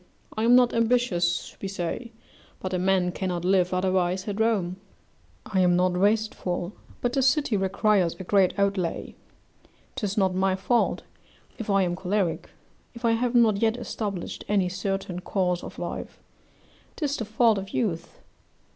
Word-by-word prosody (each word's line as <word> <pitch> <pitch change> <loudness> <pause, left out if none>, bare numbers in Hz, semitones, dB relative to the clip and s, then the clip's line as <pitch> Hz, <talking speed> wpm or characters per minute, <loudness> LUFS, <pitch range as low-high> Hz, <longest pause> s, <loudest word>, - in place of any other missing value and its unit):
I 220 - 0
am 240 +1 +6
not 250 -1 +5
ambitious, 225 -7 +1
we 195 - -3
say; 195 +5 -4 0.5
but 185 0 -4
a 180 - 0
man 185 -1 +2
cannot 175 -1 -3
live 185 -1 +3
otherwise 185 0 0
at 205 0 -3
Rome; 200 -6 +1 0.7
I 190 - -1
am 180 -1 +4
not 180 0 +2
wasteful, 200 -2 0 0.3
but 245 0 0
the 270 - +2
city 265 -2 +2
requires 195 -2 +2
a 190 - -8
great 190 0 +2
outlay; 195 -4 -1 0.8
'tis 205 -1 -3
not 190 -2 +2
my 190 0 +1
fault 230 +5 +1 0.6
if 225 - -5
I 195 -1 +4
am 175 -1 -1
choleric 190 -1 -1 0.5
if 235 +1 -5
I 230 - +4
have 240 +2 0
not 225 -4 +5
yet 225 +1 +2
established 210 -6 -5
any 195 -3 +2
certain 190 -1 -3
course 180 -1 -1
of - - -9
life: - - -6 0.8
'tis 290 -3 -1
the 225 - -3
fault 220 0 +3
of 195 0 -7
youth. 190 -7 -3
195 Hz, 155 wpm, -26 LUFS, 180-225 Hz, 0.8 s, am